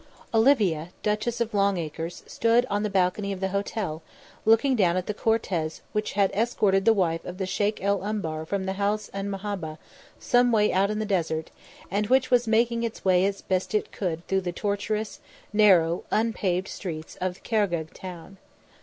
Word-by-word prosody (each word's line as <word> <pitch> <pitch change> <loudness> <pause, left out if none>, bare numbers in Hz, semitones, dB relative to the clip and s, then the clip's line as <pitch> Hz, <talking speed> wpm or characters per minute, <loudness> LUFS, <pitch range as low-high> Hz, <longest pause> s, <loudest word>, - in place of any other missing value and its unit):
Olivia 215 - +3
Duchess 215 +3 -1
of 235 -1 -1
Longacres 175 -4 -1
stood 230 +1 +2
on 205 0 +1
the 210 - -1
balcony 195 +1 +1
of 195 - -4
the 190 0 -1
hotel, 200 -4 -3 0.4
looking 225 +5 +4
down 180 -5 +3
at 185 - -1
the 210 - -2
cortege 190 -8 -1
which 210 0 -2
had 200 -1 +2
escorted 195 -3 +1
the 225 - +7
wife 170 -5 0
of 180 - -7
the 190 - -2
Sheik 205 +2 -1
el 200 -1 +1
Umbar 160 -7 -3
from 200 +1 -1
the 190 0 -2
House 210 +1 0
'an 195 0 -3
Mahabbah 195 -6 -4 0.4
some 245 0 +3
way 210 -2 +3
out 195 +2 +3
in 210 - -2
the 215 - -1
desert 165 -5 -1 0.4
and 205 +2 0
which 255 +1 +3
was 245 -1 +4
making 230 +1 +2
its 230 -3 -4
way 185 0 +4
as 200 0 -4
best 190 +2 -1
it 210 - 0
could 170 -4 -3
through 195 0 +1
the 180 -1 -3
tortuous, 205 +3 -2 0.3
narrow, 180 -5 +4
unpaved 195 -5 0
streets 160 -4 -6
of 185 0 -3
Khargegh 175 -8 0
town. 185 +1 -9
200 Hz, 180 wpm, -26 LUFS, 180-215 Hz, 0.4 s, the